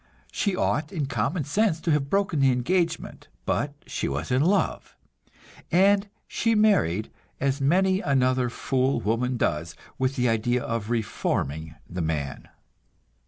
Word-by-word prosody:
She 200 -3 0
ought 150 -3 0
in 155 -6 -2
common 135 - -1
sense 170 +4 +1
to 165 - 0
have 145 -2 +1
broken 195 -4 +1
the 135 -1 +5
engagement; 165 +7 -1 0.2
but 145 0 -1
she - - -3
was 75 - -3
in 130 +2 +3
love, 185 +6 0 0.8
and 195 +3 +4 0.2
she 230 -1 +1
married, 180 - +2 0.3
as 140 +1 0
many 185 +6 +3
another 130 -2 +2
fool 130 +2 0
woman 120 +3 0
does, 85 -3 -1 0.2
with 130 +1 0
the 125 -1 +1
idea 120 +2 +1
of 115 -2 -3
"reforming" 80 - -2
the 90 0 -4
man. 75 -4 -3
135 Hz, 140 wpm, -26 LUFS, 115-170 Hz, 0.8 s, the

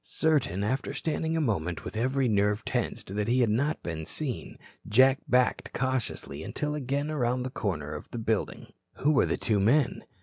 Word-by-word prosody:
Certain, 140 - +1
after 130 +5 -1
standing 160 0 -1
a - - +2
moment 90 - -1
with - - -6
every 130 +3 +1
nerve 105 0 +1
tensed, 95 - -2
that 105 +1 -1
he 125 +2 +3
had 115 -3 +3
not 145 +8 0
been 80 -2 -4
seen, 130 - -4 0.3
Jack 130 +4 +5
backed 125 +1 +2
cautiously 130 - -2
until 150 - -3
again 145 +1 -2
around 125 -3 0
the 130 - -4
corner 80 - -3
of 75 - -8
the - - -6
building. 110 -2 -2 0.2
Who 150 - +2
were 140 - +4
the - - 0
two 105 -4 +1
men? 120 +5 +2
125 Hz, 180 wpm, -28 LUFS, 105-140 Hz, 0.3 s, Jack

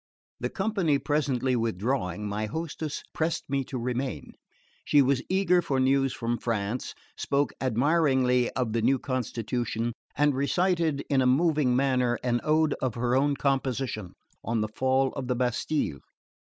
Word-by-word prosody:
The - - -2
company 190 -10 +1
presently 135 -4 0
withdrawing, 105 -3 -1
my 105 +1 -2
hostess 155 +3 -4
pressed 160 +1 -1
me 135 -1 0
to 130 - -5
remain. 125 +2 -3 0.5
She 145 - +4
was 135 -1 +3
eager 185 -1 +3
for 135 -5 -1
news 135 0 +3
from 120 0 -2
France, 115 +1 -2 0.2
spoke 140 +1 0
admiringly 130 -1 +2
of 120 -4 -1
the 115 - +1
new 130 +4 +3
constitution, 120 -2 -2 0.2
and 145 0 +3
recited 160 +1 +1
in 135 -2 +2
a 130 - +3
moving 145 -2 +3
manner 125 -2 +2
an 120 -1 +1
Ode 155 0 +2
of 130 -4 -1
her 120 +1 0
own 140 +2 +2
composition 130 -7 -1 0.3
on 115 -1 -1
the 110 - -1
Fall 130 +1 +2
of 135 -3 -5
the 125 - 0
Bastille. 125 - -1
130 Hz, 150 wpm, -27 LUFS, 120-145 Hz, 0.5 s, She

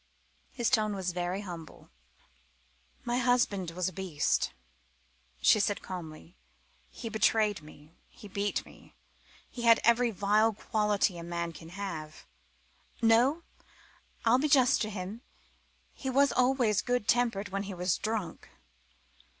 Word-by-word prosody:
His 240 -1 -1
tone 215 -4 +2
was 185 -2 -2
very 180 +2 -2
humble. 170 - -10 1.1
"My 240 +1 0
husband 240 -7 +1
was 180 +1 -2
a 190 - -4
beast," 180 -6 0 0.9
she 215 - +6
said 205 0 0
calmly. 170 -1 -8 0.5
"He 235 - -8
betrayed 215 -3 +2
me, 150 +1 -16 0.2
he 210 - -13
beat 200 +1 -2
me, - - -18 0.5
he 245 - -9
had 230 -1 +6
every 235 +1 +4
vile 215 +2 +2
quality 210 -3 0
a - - -7
man 170 0 -3
can 165 +1 -11
have. 165 -5 -7 0.7
No, 245 +8 +3 0.8
I'll 235 +3 +5
be 300 - +1
just 260 -4 +4
to 215 - -1
him: 200 +2 -6 0.7
he 265 - -5
was 275 +2 +3
always 250 -5 +2
good 245 -4 -1
tempered 230 -4 +1
when 195 +1 -2
he - - -4
was 180 0 0
drunk. 215 -6 -4
205 Hz, 135 wpm, -30 LUFS, 180-235 Hz, 1.1 s, she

